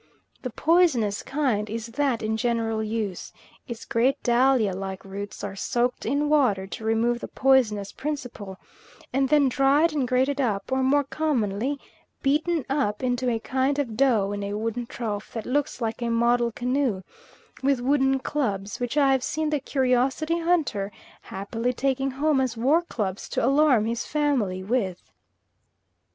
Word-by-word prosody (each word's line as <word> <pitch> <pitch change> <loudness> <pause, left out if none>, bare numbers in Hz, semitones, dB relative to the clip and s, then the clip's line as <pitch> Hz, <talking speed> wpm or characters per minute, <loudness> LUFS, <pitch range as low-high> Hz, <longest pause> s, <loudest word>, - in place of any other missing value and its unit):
The 255 - -4
poisonous 260 - +2
kind 260 -7 -1
is 225 +1 -4
that 245 -1 -1
in 220 0 0
general 225 -1 0
use; 215 -4 -3 0.4
its 235 -3 -7
great 250 +4 +2
dahlia 240 -4 +3
like 190 0 -6
roots 200 +1 -7
are 200 -1 -4
soaked 245 +5 -1
in 290 +2 +1
water 255 -11 +2
to 200 - -8
remove 225 +2 +1
the - - -6
poisonous 230 -7 +2
principle, 245 -10 -5 0.6
and 270 0 +2
then 295 -2 +4
dried 275 +5 +3
and 275 -4 0
grated 265 +3 +1
up, 215 -2 -1
or 265 0 +1
more 285 +2 +3
commonly 270 -3 -1 0.4
beaten 305 +2 +1
up 270 -6 -1
into 250 0 0
a 230 - +1
kind 265 +4 0
of 255 -7 -2
dough 225 -6 +2
in 205 0 -3
a 200 0 -3
wooden 230 +2 -3
trough 215 -5 -5
that 225 -2 -5
looks 280 -1 -1
like 225 +1 -2
a 235 - -1
model 235 +1 +2
canoe, 250 -4 -1 0.6
with 270 -1 +2
wooden 270 +1 +2
clubs, 210 -8 -2
which 245 +3 -3
I 280 -2 +5
have 265 -1 +2
seen 310 0 -1
the 300 - +1
curiosity 265 +5 +1
hunter 310 - 0 0.3
happily 225 +6 -3
taking 270 +1 0
home 280 +1 +1
as 250 -3 -2
war 280 +9 +3
clubs 205 - -4
to - - 0
alarm 275 -4 +4
his 230 +1 -2
family 255 -12 0
with. 195 -4 -2
250 Hz, 160 wpm, -25 LUFS, 220-275 Hz, 0.6 s, I